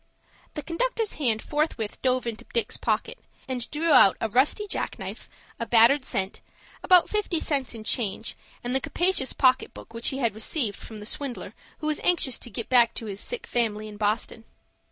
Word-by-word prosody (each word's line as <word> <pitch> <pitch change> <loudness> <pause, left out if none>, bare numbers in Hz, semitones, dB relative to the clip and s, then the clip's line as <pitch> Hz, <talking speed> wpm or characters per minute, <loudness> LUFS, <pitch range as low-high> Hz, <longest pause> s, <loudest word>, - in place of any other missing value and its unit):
The 300 - -4
conductor's 445 - -1
hand 225 -5 +1
forthwith 295 -8 -2
dove 255 -1 +1
into 230 -2 -4
Dick's 235 - 0
pocket, - - -1 0.3
and 250 -3 -4
drew 320 +2 0
out 195 - +7
a 225 - -1
rusty 270 - +2
jack - - -3
knife, - - -7 0.3
a 230 - -3
battered 240 +4 +5
cent, 190 +1 -2 0.4
about 360 -2 +6
fifty 410 -6 0
cents 275 -6 -2
in 220 - -8
change, 220 -1 -1 0.3
and 245 +1 -1
the 265 - +2
capacious 350 -7 +1
pocket 255 -1 +2
book - - -12
which 230 0 -3
he 265 - -3
had 235 -5 0
received 220 0 -2
from 220 - -9
the 210 - -9
swindler 265 +2 -4 0.3
who - - -4
was 305 -1 +1
anxious 320 -8 +2
to - - -5
get 230 +1 -5
back 240 -2 +4
to 225 - -5
his 200 -2 -6
sick 480 - -4
family 215 -3 -1
in 210 -1 -10
Boston. 215 +2 -1
250 Hz, 190 wpm, -26 LUFS, 225-300 Hz, 0.4 s, out